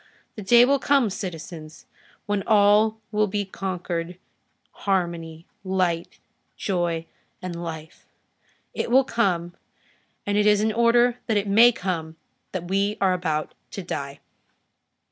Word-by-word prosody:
The 215 - -7
day 235 +5 +6
will 280 +2 +2
come, 270 -6 +2
citizens, 165 -4 -7 0.4
when 205 -1 -1
all 215 +1 +4
will 210 0 +2
be 205 +1 -2
concord, 180 -2 -4 0.5
harmony, 170 -4 -2 0.2
light, 185 -3 -1 0.4
joy 175 -4 -1 0.3
and 175 -2 -6
life; 160 -1 -8 0.7
it - - -3
will 260 +3 +5
come, 175 -9 0 0.7
and 205 0 +1
it 210 - +3
is 210 -1 +5
in 220 +1 +1
order 240 +1 +3
that 220 -3 +2
it 205 0 -1
may 225 +5 +7
come 170 -7 -4 0.4
that 175 -2 -5
we 200 +3 0
are 190 -2 +3
about 155 -4 -2 0.2
to 195 - -7
die." 140 -5 -5
190 Hz, 130 wpm, -24 LUFS, 170-210 Hz, 0.7 s, may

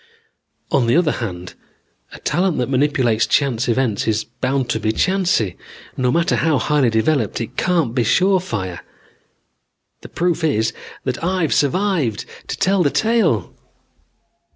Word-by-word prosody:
"On 120 - +2
the 115 - +3
other 165 -3 +3
hand, 90 -6 -5 0.6
a - - -10
talent 180 -1 0
that 125 +1 -1
manipulates 130 -5 +2
chance 130 -4 +1
events 115 -4 0
is 110 0 +1
bound 130 +2 -2
to 110 - -1
be 110 0 0
chancy. 180 - 0 0.4
No 125 -1 +1
matter 170 +5 +1
how 160 -3 +2
highly 145 -3 +2
developed 115 0 0
it 115 - -6
can't 170 -10 +1
be 125 -2 +1
surefire. 120 - +1 1.2
The - - -11
proof 175 -1 -1
is 110 -8 +1 0.3
that - - -3
I've 180 -3 0
survived 155 - 0 0.2
to - - -4
tell 195 0 +2
the 150 - +3
tale." 195 - +1
135 Hz, 140 wpm, -19 LUFS, 115-175 Hz, 1.2 s, the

